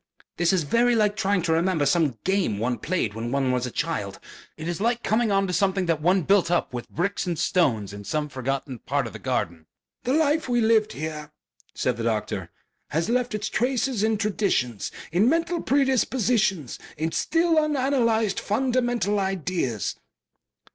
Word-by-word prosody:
"This 175 Hz, 0 st, +3 dB
is 185 Hz, -4 st, +2 dB
very 235 Hz, +10 st, +3 dB
like 210 Hz, -2 st, +2 dB
trying 200 Hz, -4 st, +1 dB
to 165 Hz, -2 st, +1 dB
remember 165 Hz, -2 st, +1 dB
some 145 Hz, -4 st, +2 dB
game 190 Hz, -, +1 dB
one 120 Hz, +2 st, -1 dB
played 160 Hz, -, -1 dB
when 115 Hz, +2 st, -4 dB
one 135 Hz, -1 st, +1 dB
was 125 Hz, 0 st, 0 dB
a -, -, -4 dB
child. -, -, -3 dB, 0.4 s
It 155 Hz, +1 st, -6 dB
is 175 Hz, +2 st, -3 dB
like 235 Hz, +2 st, 0 dB
coming 220 Hz, 0 st, +1 dB
on 195 Hz, 0 st, +2 dB
something 190 Hz, +1 st, +1 dB
that 165 Hz, -3 st, 0 dB
one 180 Hz, +3 st, +3 dB
built 195 Hz, -1 st, +3 dB
up 175 Hz, -6 st, 0 dB
with 120 Hz, -1 st, -6 dB
bricks 190 Hz, +2 st, -2 dB
and 170 Hz, -2 st, -1 dB
stones 125 Hz, -, +1 dB
in 100 Hz, 0 st, -8 dB
some 150 Hz, +7 st, -2 dB
forgotten 135 Hz, -1 st, -4 dB
part 140 Hz, +3 st, -1 dB
of 115 Hz, -, -7 dB
the -, -, -8 dB
garden...." 85 Hz, -11 st, -2 dB, 0.4 s
"The 255 Hz, -, 0 dB
life 310 Hz, -1 st, +2 dB
we 240 Hz, 0 st, +2 dB
lived 220 Hz, -1 st, +3 dB
here," 150 Hz, 0 st, -6 dB, 0.4 s
said -, -, 0 dB
the 115 Hz, -, -4 dB
doctor, 110 Hz, -2 st, -2 dB, 0.4 s
"has 165 Hz, +7 st, -1 dB
left 245 Hz, -1 st, 0 dB
its 215 Hz, 0 st, -2 dB
traces 250 Hz, -2 st, 0 dB
in 220 Hz, 0 st, +2 dB
traditions, 195 Hz, -, -1 dB, 0.2 s
in 195 Hz, +8 st, +3 dB
mental 335 Hz, +2 st, 0 dB
predispositions, 245 Hz, -, +1 dB, 0.2 s
in 160 Hz, +2 st, -1 dB
still 330 Hz, -, +1 dB
unanalyzed 255 Hz, -8 st, +1 dB
fundamental 240 Hz, -2 st, 0 dB
ideas." 180 Hz, -, -2 dB
190 Hz, 170 wpm, -25 LUFS, 145-230 Hz, 0.4 s, This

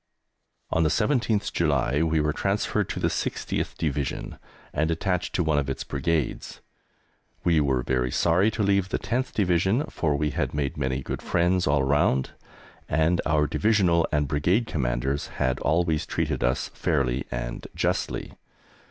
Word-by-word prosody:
On 80 Hz, -, +2 dB
the 80 Hz, -, +3 dB
17th 110 Hz, -, +1 dB
July 70 Hz, -3 st, +1 dB
we 80 Hz, -1 st, +2 dB
were 75 Hz, 0 st, +1 dB
transferred -, -, 0 dB
to -, -, -3 dB
the -, -, +1 dB
60th -, -, -2 dB
Division 70 Hz, -3 st, -3 dB, 0.3 s
and 80 Hz, +2 st, +1 dB
attached 90 Hz, +2 st, -1 dB
to 90 Hz, -, +2 dB
one 80 Hz, -2 st, +2 dB
of 70 Hz, -1 st, -2 dB
its 65 Hz, -, -3 dB
Brigades. 75 Hz, +1 st, -2 dB, 0.8 s
We 85 Hz, -2 st, +3 dB
were 65 Hz, -3 st, +1 dB
very 60 Hz, 0 st, 0 dB
sorry 85 Hz, -, +3 dB
to 110 Hz, -1 st, -2 dB
leave 100 Hz, -1 st, +2 dB
the -, -, 0 dB
10th 130 Hz, +2 st, -2 dB
Division, 95 Hz, -, +2 dB
for 75 Hz, -3 st, 0 dB
we 75 Hz, +1 st, 0 dB
had -, -, -2 dB
made 70 Hz, -2 st, -1 dB
many 65 Hz, -2 st, -2 dB
good -, -, -4 dB
friends 90 Hz, +1 st, +1 dB
all 70 Hz, -1 st, +3 dB
round, 65 Hz, -1 st, +2 dB, 0.6 s
and 80 Hz, +2 st, +2 dB
our 75 Hz, -1 st, +3 dB
Divisional 85 Hz, +1 st, +2 dB
and 75 Hz, -1 st, +1 dB
Brigade 85 Hz, -, +1 dB
Commanders 70 Hz, -, -1 dB
had 65 Hz, -1 st, 0 dB
always 80 Hz, -1 st, +1 dB
treated -, -, -1 dB
us 65 Hz, +2 st, 0 dB
fairly 65 Hz, 0 st, 0 dB
and -, -, -5 dB
justly. -, -, -1 dB
75 Hz, 155 wpm, -26 LUFS, 70-90 Hz, 0.8 s, the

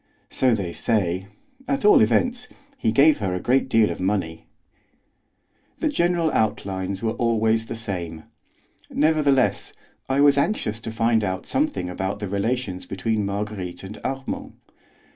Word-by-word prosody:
"So 125 Hz, -3 st, +2 dB
they 90 Hz, -5 st, -4 dB
say; 95 Hz, -4 st, 0 dB, 0.4 s
at 275 Hz, -5 st, -1 dB
all 210 Hz, -, +7 dB
events, 245 Hz, -, +2 dB, 0.3 s
he 185 Hz, -, 0 dB
gave 140 Hz, +5 st, +5 dB
her 95 Hz, -4 st, -1 dB
a -, -, -2 dB
great 130 Hz, +6 st, +1 dB
deal 110 Hz, -3 st, +4 dB
of -, -, -6 dB
money." 90 Hz, -4 st, -2 dB, 1.3 s
The 315 Hz, -, 0 dB
general 170 Hz, -, +1 dB
outlines 100 Hz, -2 st, -1 dB
were 110 Hz, -, +1 dB
always 115 Hz, -1 st, +1 dB
the 115 Hz, -, -5 dB
same. 85 Hz, -8 st, -5 dB, 0.7 s
Nevertheless 145 Hz, -4 st, +2 dB, 0.4 s
I 135 Hz, +1 st, +1 dB
was 140 Hz, -1 st, +5 dB
anxious 130 Hz, -, -1 dB
to 115 Hz, 0 st, -6 dB
find 115 Hz, 0 st, +2 dB
out 95 Hz, -1 st, -3 dB
something 295 Hz, -, -1 dB
about 95 Hz, +2 st, -3 dB
the 105 Hz, -1 st, -5 dB
relations 100 Hz, -1 st, -2 dB
between 105 Hz, +2 st, -1 dB
Marguerite 100 Hz, -3 st, -4 dB
and 95 Hz, +2 st, -8 dB
Armand. 135 Hz, 0 st, -4 dB
110 Hz, 140 wpm, -23 LUFS, 95-135 Hz, 1.3 s, all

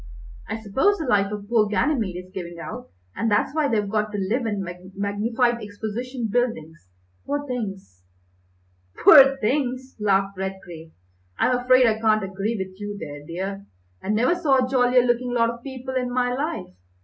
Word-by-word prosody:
I 220 Hz, -, -4 dB
suppose 265 Hz, -, +1 dB
the 320 Hz, -, -4 dB
life 200 Hz, -4 st, +2 dB
of 205 Hz, -1 st, -6 dB
poor 220 Hz, -2 st, +3 dB
Ganymede 215 Hz, -, 0 dB
is 185 Hz, -, -20 dB
giving 175 Hz, -3 st, -6 dB
out, -, -, -7 dB, 0.3 s
and 230 Hz, -, 0 dB
that's 210 Hz, +6 st, +1 dB
why 310 Hz, -2 st, +1 dB
they've 210 Hz, -5 st, 0 dB
got 215 Hz, +1 st, -1 dB
to 205 Hz, -, -4 dB
live 220 Hz, +5 st, -1 dB
in 205 Hz, -3 st, -2 dB, 0.3 s
magnified 230 Hz, +4 st, 0 dB
exposition 225 Hz, +4 st, -5 dB
buildings, 195 Hz, -, -2 dB, 0.4 s
poor 285 Hz, 0 st, -3 dB
things!" 195 Hz, -, -6 dB, 1.0 s
"Poor 275 Hz, -3 st, +8 dB
things!" 260 Hz, +1 st, -2 dB
laughed 195 Hz, -1 st, +1 dB
Redgrave. 175 Hz, -4 st, -6 dB, 0.5 s
"I'm 250 Hz, -, +2 dB
afraid 255 Hz, +1 st, +4 dB
I 220 Hz, -1 st, +2 dB
can't 215 Hz, -1 st, +2 dB
agree 195 Hz, +4 st, -3 dB
with 190 Hz, 0 st, -6 dB
you 205 Hz, 0 st, -5 dB
there, 145 Hz, -5 st, -8 dB
dear. 195 Hz, +5 st, -5 dB, 0.3 s
I -, -, -7 dB
never 230 Hz, +9 st, +3 dB
saw 280 Hz, -7 st, +2 dB
a -, -, -6 dB
jollier 250 Hz, -1 st, +4 dB
looking 245 Hz, 0 st, 0 dB
lot 230 Hz, -1 st, +3 dB
of 235 Hz, 0 st, -11 dB
people 260 Hz, 0 st, -7 dB
in 250 Hz, -1 st, -1 dB
my 245 Hz, 0 st, +1 dB
life. 295 Hz, -, -3 dB
225 Hz, 170 wpm, -23 LUFS, 200-255 Hz, 1.0 s, Poor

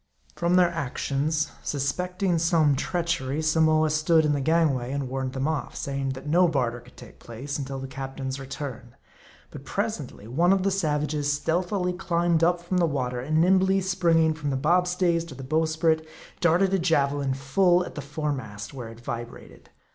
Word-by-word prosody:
From 170 Hz, +1 st, +1 dB
their 180 Hz, -1 st, +5 dB
actions, 150 Hz, 0 st, -1 dB
suspecting 180 Hz, +5 st, -1 dB
some 160 Hz, -4 st, +3 dB
treachery, 165 Hz, -3 st, -1 dB
Samoa 155 Hz, 0 st, +3 dB
stood 155 Hz, +1 st, +3 dB
in 150 Hz, -, +2 dB
the 140 Hz, -, -1 dB
gangway, 140 Hz, -5 st, +1 dB
and 140 Hz, -1 st, -2 dB
warned 130 Hz, 0 st, -3 dB
them 135 Hz, +1 st, -1 dB
off; 160 Hz, -3 st, -3 dB
saying 135 Hz, -1 st, -3 dB
that 130 Hz, +1 st, -10 dB
no 175 Hz, +4 st, +4 dB
barter 125 Hz, -6 st, -1 dB
could -, -, -19 dB
take -, -, -13 dB
place 135 Hz, +6 st, -6 dB
until 135 Hz, 0 st, -4 dB
the 135 Hz, -, -5 dB
captain's 135 Hz, 0 st, -5 dB
return. 130 Hz, -3 st, -7 dB, 0.6 s
But -, -, -9 dB
presently 105 Hz, -, -4 dB
one 170 Hz, +10 st, +3 dB
of 195 Hz, -1 st, +1 dB
the 195 Hz, -, +1 dB
savages 150 Hz, -5 st, 0 dB
stealthily 180 Hz, +5 st, 0 dB
climbed 170 Hz, -2 st, +1 dB
up 175 Hz, +1 st, +3 dB
from 175 Hz, +2 st, -2 dB
the 175 Hz, -2 st, +3 dB
water, 125 Hz, -4 st, -2 dB
and 155 Hz, +5 st, 0 dB
nimbly 190 Hz, +2 st, +4 dB
springing 170 Hz, -4 st, +2 dB
from 150 Hz, -2 st, -4 dB
the 135 Hz, -, 0 dB
bob 175 Hz, +6 st, +2 dB
stays 180 Hz, -2 st, +1 dB
to 155 Hz, -6 st, -10 dB
the 135 Hz, -, -8 dB
bow 155 Hz, +5 st, +1 dB
sprit, 160 Hz, 0 st, +1 dB, 0.3 s
darted 180 Hz, +3 st, +3 dB
a 195 Hz, -, +3 dB
javelin 140 Hz, -5 st, +1 dB
full 175 Hz, +7 st, +2 dB
at -, -, -9 dB
the 150 Hz, -, -5 dB
foremast, 140 Hz, -8 st, -5 dB
where 125 Hz, -4 st, -7 dB
it 115 Hz, 0 st, -12 dB
vibrated. 120 Hz, 0 st, -8 dB
155 Hz, 180 wpm, -26 LUFS, 135-170 Hz, 0.6 s, their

